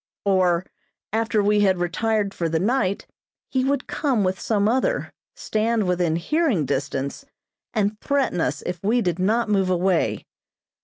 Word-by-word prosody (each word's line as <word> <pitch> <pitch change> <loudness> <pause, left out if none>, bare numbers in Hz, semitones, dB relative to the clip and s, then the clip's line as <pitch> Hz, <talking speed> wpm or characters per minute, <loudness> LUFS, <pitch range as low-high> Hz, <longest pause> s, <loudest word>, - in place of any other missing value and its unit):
Or, 185 -2 +2 0.5
after 225 -1 +1
we 210 +1 +3
had 190 -2 +3
retired 200 +3 0
for 170 -3 -2
the 160 0 0
night, 200 -1 0 0.5
he 260 -1 +1
would 275 0 0
come 260 -9 0
with 185 0 -1
some 205 -2 +1
other, 260 - 0 0.2
stand 220 -1 0
within 175 -3 +1
hearing 230 - +1
distance, 140 - -3 0.5
and 210 0 0
threaten 275 - 0
us - - -1
if 180 -1 -3
we 230 +5 +2
did 175 -2 -1
not 225 +5 +1
move 195 -3 +1
away. 180 -1 +1
200 Hz, 150 wpm, -23 LUFS, 180-225 Hz, 0.5 s, we